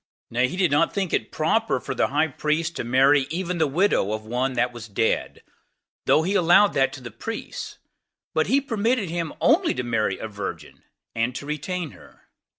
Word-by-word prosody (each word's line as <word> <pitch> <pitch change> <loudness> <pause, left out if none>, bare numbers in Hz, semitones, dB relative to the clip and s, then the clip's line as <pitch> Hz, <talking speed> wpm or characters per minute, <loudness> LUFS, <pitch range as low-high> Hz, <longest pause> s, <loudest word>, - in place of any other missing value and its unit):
Nay, 125 +2 +2
he 180 - -6
did 180 -5 +2
not 145 +4 +2
think 195 -4 -1
it - - 0
proper 160 - +1
for 135 - -5
the - - +1
high 150 +4 +1
priest 155 +4 -1
to - - -2
marry 135 +3 +4
even 175 +2 -3
the 160 - +3
widow 145 - +1
of 110 0 -5
one 125 +4 -1
that 125 0 0
was 115 -2 -8
dead, 110 +2 -1 0.6
though 155 - +4
he 190 +4 0
allowed 185 +2 +5
that 135 - +2
to 135 - -9
the 120 -2 -8
priests; 225 - -6 0.6
but - - +1
he 275 - +4
permitted 225 -6 0
him 170 -2 -2
only 330 +6 +3
to 125 - -2
marry 110 -5 0
a 110 - -5
virgin, 95 -7 -7 0.3
and 115 +2 -1
to 140 - -6
retain 155 +2 -3
her. - - -18
145 Hz, 195 wpm, -24 LUFS, 120-180 Hz, 0.6 s, allowed